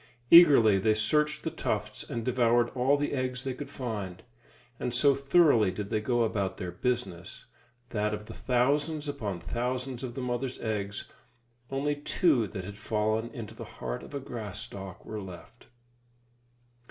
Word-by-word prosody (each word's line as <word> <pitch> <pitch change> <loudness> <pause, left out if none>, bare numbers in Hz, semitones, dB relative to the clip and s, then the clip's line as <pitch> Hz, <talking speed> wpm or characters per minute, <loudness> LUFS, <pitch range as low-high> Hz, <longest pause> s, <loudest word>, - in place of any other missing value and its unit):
Eagerly 135 - +8
they 110 +2 +3
searched 150 +8 +2
the - - -2
tufts - - -3
and 115 -1 -5
devoured 120 -1 +3
all 130 +3 +2
the 145 0 -1
eggs 130 -1 -2
they 130 - -2
could 145 +3 -7
find; 105 -8 -5 0.6
and 125 - -2
so 140 +3 +5
thoroughly 140 - +4
did 100 +2 -5
they 105 - +1
go 120 +1 +1
about 100 -4 -1
their 90 -1 -4
business, 95 -4 -3 0.5
that 105 -1 0
of 105 0 -5
the - - -9
thousands 145 +5 +1
upon 110 -11 -3
thousands 125 +3 -3
of 120 -2 -5
the - - -4
mother's 125 +1 -3
eggs, 105 -2 -3 0.6
only 140 +2 0
two 145 - +2
that 95 -2 -6
had 100 +1 -9
fallen 110 +1 0
into 115 -2 -8
the - - -8
heart - - -4
of - - -10
a - - -1
grass 115 -7 -6
stalk 95 -2 -8
were 110 -1 -5
left. 95 +5 -11
120 Hz, 165 wpm, -29 LUFS, 105-135 Hz, 0.6 s, Eagerly